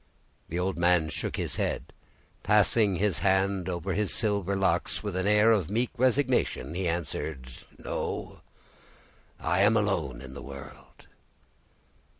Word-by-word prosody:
The 85 - -3
old 90 0 -1
man 85 -2 +3
shook 70 - -4
his - - -2
head, - - -1
and, - - -20 0.5
passing 105 0 +3
his 95 -4 +1
hand 95 0 +1
over 90 +1 -3
his 105 -1 +1
silver 100 -3 0
locks, 95 -1 0
with 105 -3 -4
an 95 +2 0
air 105 +2 +5
of 100 -8 +1
meek 115 +4 0
resignation, 125 - +1
he 90 +1 -2
answered,— 80 -5 -3 0.3
"No; - - -5 1.0
I 90 +3 0
am 105 +3 +5
alone 85 - -1
in 65 +1 -10
the 70 - -8
world!" 70 0 -11
95 Hz, 145 wpm, -28 LUFS, 85-105 Hz, 1.0 s, air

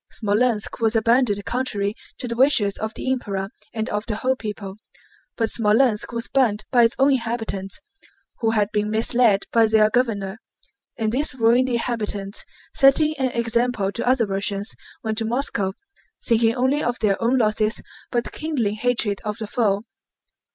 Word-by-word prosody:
Smolénsk 215 +1 0
was 225 0 +2
abandoned 225 -2 +2
contrary 210 -5 -1 0.2
to 250 - -4
the 235 - -2
wishes 235 -6 +3
of 220 0 -4
the 260 - -2
Emperor 195 -7 -3 0.2
and 220 -1 -3
of 210 0 -1
the 220 - -2
whole 260 +4 0
people. 210 -4 -7 0.6
But 225 -1 0
Smolénsk 220 +1 +2
was 235 0 -3
burned 225 -6 +1
by 240 -2 +5
its 230 - +1
own 275 +1 +4
inhabitants 225 -6 -2 0.6
who 225 - +1
had 210 -2 +1
been 210 0 -1
misled 220 -1 +2
by 230 -1 +4
their 215 -1 +4
governor. 220 -4 -1 0.6
And 220 -2 -1
these 270 +2 +2
ruined 245 +2 +3
inhabitants, 215 -4 -2 0.3
setting 300 +3 +5
an 260 -1 +1
example 235 -3 0
to 235 - -4
other 250 -2 +3
Russians, 200 +1 -2 0.3
went 220 0 -1
to 225 - -1
Moscow 225 -5 -1 0.5
thinking 230 -1 +4
only 260 +4 +1
of 240 +1 -1
their 205 -1 0
own 240 +3 +2
losses 215 -1 +1 0.3
but 240 -1 -2
kindling 250 -10 -2
hatred 225 -3 0
of 210 -1 -3
the 225 - -5
foe. 205 -2 0
225 Hz, 160 wpm, -22 LUFS, 210-245 Hz, 0.6 s, by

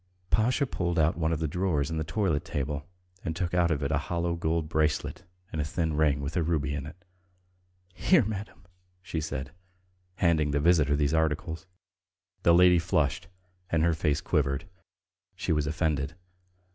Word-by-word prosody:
Pasha 125 +6 +3
pulled 85 -8 -2
out 80 +1 +3
one 80 -1 0
of 80 - +1
the 80 +1 -1
drawers 80 -3 0
in 80 - -2
the - - 0
toilet 80 -1 0
table 75 0 -3 0.3
and 80 -3 -3
took 90 0 -2
out 90 -1 +3
of 75 -3 0
it 70 - -1
a 75 - +2
hollow 85 +2 -1
gold 80 -1 -1
bracelet 80 -1 -1 0.3
and 80 - -2
a - - 0
thin 80 +1 -1
ring 75 -2 +2
with 70 +3 -4
a 90 - +2
ruby 75 -3 0
in 70 0 -4
it. 80 - -9 1.0
"Here, 150 - +4
madam!" 105 -3 -6 0.4
she 80 -2 -3
said, 70 -3 -4 0.6
handing 80 -5 +2
the 70 0 +1
visitor 75 -2 +4
these 75 0 +1
articles. 80 +3 -1 0.7
The 85 - +5
lady 90 0 +6
flushed 80 -3 0 0.4
and 80 -3 +2
her 85 0 +3
face 75 -1 0
quivered. 70 -2 0 0.7
She - - -2
was 75 -2 +1
offended. 75 -1 -1
80 Hz, 170 wpm, -28 LUFS, 75-85 Hz, 1.0 s, lady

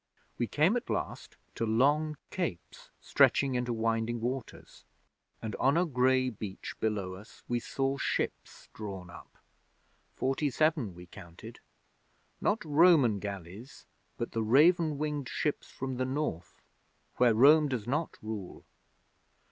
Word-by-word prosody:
We 120 - 0
came 160 - +2
at 245 - -3
last - - -4 0.2
to - - -3
long 145 +7 +2
capes 170 - -5
stretching 135 -2 +3
into 125 -1 -1
winding 115 +1 -1
waters, 125 +1 -6 0.6
and 110 -2 -4
on 135 +4 +3
a 180 - +3
grey 130 -3 +2
beach 100 -3 -7
below 100 -4 -1
us 100 +4 -13
we 120 0 0
saw 135 +3 -2
ships - - -3
drawn 95 -5 -7
up. 85 - -14 0.8
Forty 135 +3 0
seven 145 - +1
we 90 0 -11
counted 85 -2 -12 0.8
not 210 -3 0
Roman 150 - +5
galleys 100 - -8 0.3
but 115 - -4
the 115 - -1
raven 155 +7 +4
winged 150 -3 -3
ships 150 - -2
from 130 -1 -5
the 130 - 0
North 130 - -4 0.5
where 120 -3 +4
Rome 150 +6 +6
does 125 -6 -3
not 150 +6 -2
rule. 110 -4 -7
125 Hz, 130 wpm, -30 LUFS, 110-150 Hz, 0.8 s, Rome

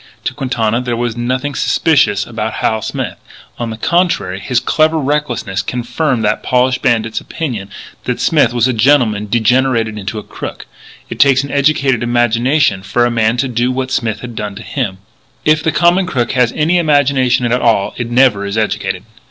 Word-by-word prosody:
To - - -2
Quintana 120 -4 -1
there 120 -2 -2
was 120 -1 -2
nothing 130 +4 -2
suspicious 110 -11 +2
about 110 -1 -4
Hal 110 0 -1
Smith. - - -4 0.4
On 120 -1 -3
the 110 - -6
contrary, 170 - 0
his 120 +4 0
clever 155 +5 +2
recklessness 135 -9 -1
confirmed 125 +1 -2
that 105 - 0
polished 125 0 +1
bandit's 115 -2 0
opinion 120 -12 -5 0.4
that 125 - -2
Smith 150 -8 +3
was 120 0 +2
a 130 - 0
gentleman 115 -4 +2
degenerated 115 -1 +1
into 100 +3 -5
a 105 - -5
crook. - - -8 0.5
It - - -6
takes 135 -1 +5
an 140 - -6
educated 140 -3 +2
imagination 120 -1 +1
for 100 +5 +1
a 120 - 0
man 115 0 +1
to 135 - 0
do 120 0 0
what 130 0 -3
Smith 110 -5 -1
had 120 -2 -8
done 105 -2 -5
to - - -9
him. 95 - -3 0.5
If 155 0 +3
the 160 - 0
common 175 +3 +3
crook 125 -9 -1
has 125 -2 +2
any 165 +4 +2
imagination 140 -5 +2
at 125 +1 +1
all 110 -4 +2
it 120 -1 -4
never 120 -4 +3
is 100 +2 -3
educated. 95 -4 -2
120 Hz, 180 wpm, -15 LUFS, 110-135 Hz, 0.5 s, takes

